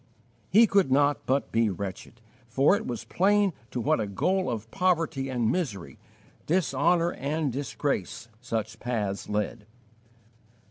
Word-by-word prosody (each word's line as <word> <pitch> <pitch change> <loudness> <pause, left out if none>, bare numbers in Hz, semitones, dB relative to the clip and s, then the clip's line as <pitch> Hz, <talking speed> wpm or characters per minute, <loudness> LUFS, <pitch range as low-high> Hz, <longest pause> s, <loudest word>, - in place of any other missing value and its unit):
He 225 +3 +7
could 195 -9 +2
not 145 +1 +2
but 135 +2 0
be 115 -1 +2
wretched, 100 +4 -6 0.3
for 135 +10 +3
it - - -4
was 120 -3 -4
plain 200 0 +2 0.2
to 125 - -4
what 115 - +1
a 105 - -1
goal 185 - 0
of 115 -2 -5
poverty 165 -7 0
and 120 -3 0
misery, 100 - -3 0.5
dishonour 170 +1 +2
and 145 0 -2
disgrace, 115 -5 -3
such 115 -2 -4
paths 105 -5 -3
lead. 105 +1 -2
130 Hz, 135 wpm, -27 LUFS, 110-165 Hz, 0.5 s, He